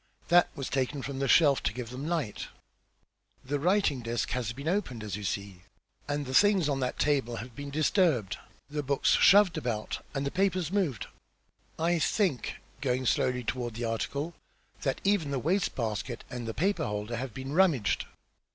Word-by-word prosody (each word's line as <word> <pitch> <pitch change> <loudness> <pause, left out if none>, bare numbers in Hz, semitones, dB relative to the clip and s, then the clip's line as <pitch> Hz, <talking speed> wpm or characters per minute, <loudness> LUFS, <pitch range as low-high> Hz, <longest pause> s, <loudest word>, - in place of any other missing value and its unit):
"That 175 0 +6
was 135 -4 -4
taken 135 +1 -1
from 135 -1 -4
the 135 - 0
shelf 145 -4 +5
to - - 0
give 120 -1 -6
them 135 +4 -5
light. 160 -11 -2 1.0
Then 130 - -14
the 145 - +1
writing 180 -3 +2
desk 115 -1 -2
has 120 -3 -1
been 140 +6 -7
opened, 165 - -1
as 105 -2 -4
you 105 - -6
see, 100 -1 -4 0.5
and 145 0 -2
the 130 - -5
things 200 0 +5
on 140 -2 0
that 125 -1 -2
table 135 -5 +1
have 115 +1 -8
been 145 0 -6
disturbed, 150 - +1 0.3
the 150 +1 -3
books 140 0 +1
shoved 200 -2 +6
about, 115 -3 -3
and 135 0 -1
the 140 - -1
papers 185 -3 0
moved. 180 - 0 0.7
I 170 +1 +1
think," 165 - 0 0.3
going 130 -1 0
slowly 125 +1 +1
toward 120 -1 -3
the 120 +1 -3
article, 140 +8 -2 0.5
"that 135 -2 -1
even 195 -7 +2
the 140 - -1
waste 180 +8 0
basket 115 +1 -3
and 120 -2 -5
the 115 - -4
paper 195 +6 +1
holder 105 +3 -3
have 125 -2 -5
been 135 +1 -5
rummaged." 160 - +3
135 Hz, 180 wpm, -29 LUFS, 120-165 Hz, 1.0 s, That